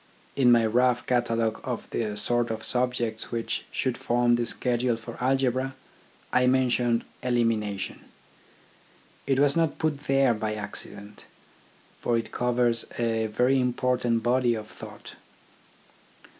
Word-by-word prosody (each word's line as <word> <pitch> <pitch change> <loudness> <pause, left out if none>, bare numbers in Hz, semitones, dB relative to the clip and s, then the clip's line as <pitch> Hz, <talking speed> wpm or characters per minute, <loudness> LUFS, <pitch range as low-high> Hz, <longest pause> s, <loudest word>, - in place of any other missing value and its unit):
In 125 -3 +5
my 115 -1 +5
rough 120 +2 +2
catalogue 115 -3 0
of 125 -3 -4
the 105 -2 -2
sort 120 +2 +1
of 110 -1 -4
subjects 125 -3 -1
which 115 -1 -3
should 130 -2 -2
form 120 0 +2
the 120 0 +1
schedule 120 -1 +1
for 115 +1 -9
algebra, 130 0 +1 0.6
I 125 0 +4
mentioned 125 -2 +2 0.2
Elimination. 115 -5 -1 1.2
It 135 -1 +2
was 140 0 +4
not 165 -2 +1
put 155 -3 -1
there 135 -2 +3
by 110 -1 -3
accident, 105 0 -8 0.7
for 120 - +1
it 115 - -4
covers 120 -1 +1
a 115 -1 0
very 125 +5 +2
important 125 -2 0
body 120 0 +2
of 110 -1 -6
thought. - - -11
120 Hz, 130 wpm, -26 LUFS, 115-125 Hz, 1.2 s, In